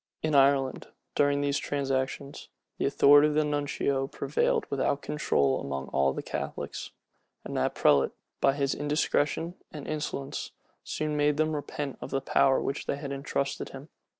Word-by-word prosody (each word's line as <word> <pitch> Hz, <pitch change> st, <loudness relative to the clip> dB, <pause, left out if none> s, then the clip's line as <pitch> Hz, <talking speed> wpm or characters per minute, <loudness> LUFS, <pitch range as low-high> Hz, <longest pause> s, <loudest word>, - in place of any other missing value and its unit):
In 155 Hz, -1 st, 0 dB
Ireland, 135 Hz, -1 st, +3 dB, 0.3 s
during 145 Hz, 0 st, +2 dB
these 140 Hz, 0 st, +1 dB
transactions, 140 Hz, +1 st, -2 dB, 0.3 s
the -, -, +2 dB
authority 145 Hz, +1 st, +6 dB
of 150 Hz, -, -1 dB
the 155 Hz, 0 st, +3 dB
nuncio 140 Hz, -2 st, 0 dB
prevailed 140 Hz, +1 st, 0 dB
without 140 Hz, +1 st, 0 dB
control 70 Hz, -, +1 dB
among 70 Hz, -1 st, -4 dB
all 70 Hz, 0 st, +2 dB
the -, -, -5 dB
Catholics; -, -, -5 dB, 0.5 s
and -, -, -6 dB
that -, -, 0 dB
prelate, 70 Hz, -2 st, +4 dB, 0.3 s
by 135 Hz, -, +4 dB
his 140 Hz, -1 st, 0 dB
indiscretion 150 Hz, +2 st, 0 dB, 0.2 s
and 150 Hz, -3 st, -8 dB
insolence, 150 Hz, -3 st, -4 dB, 0.3 s
soon 155 Hz, -1 st, -2 dB
made 145 Hz, 0 st, +2 dB
them 155 Hz, 0 st, +1 dB
repent 145 Hz, -1 st, -4 dB
of -, -, -6 dB
the 135 Hz, -, 0 dB
power 135 Hz, 0 st, +3 dB
with 135 Hz, -, -2 dB
which -, -, -7 dB
they -, -, 0 dB
had 140 Hz, -1 st, -6 dB
intrusted 140 Hz, 0 st, -2 dB
him. 135 Hz, +3 st, -10 dB
140 Hz, 160 wpm, -28 LUFS, 135-145 Hz, 0.5 s, authority